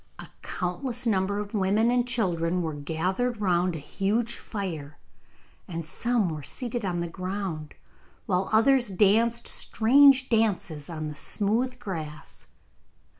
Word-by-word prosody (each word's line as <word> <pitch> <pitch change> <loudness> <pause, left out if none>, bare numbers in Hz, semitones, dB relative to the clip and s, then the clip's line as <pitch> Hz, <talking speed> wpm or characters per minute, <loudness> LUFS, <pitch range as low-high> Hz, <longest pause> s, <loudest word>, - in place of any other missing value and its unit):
A - - -8 0.2
countless 235 +8 -3
number 200 -2 +1
of 205 +1 -5
women 210 +3 +2
and 245 0 +1
children 180 -7 +1
were 160 -1 -3
gathered 180 +11 -2
round 180 -3 +1
a - - -3
huge 205 +10 -1
fire, 160 -9 -6 0.7
and 165 -2 -5
some 230 +3 0
were 155 -1 -5
seated 240 - -4
on 175 -3 -1
the 170 - -2
ground, 185 -3 -5 0.5
while 185 -3 0
others 240 +3 +4
danced 220 +5 +3
strange 265 +3 +5
dances 195 -10 0
on 155 -2 -4
the 150 - -5
smooth 225 - -1
grass. 155 -8 -7
195 Hz, 130 wpm, -27 LUFS, 170-235 Hz, 0.7 s, strange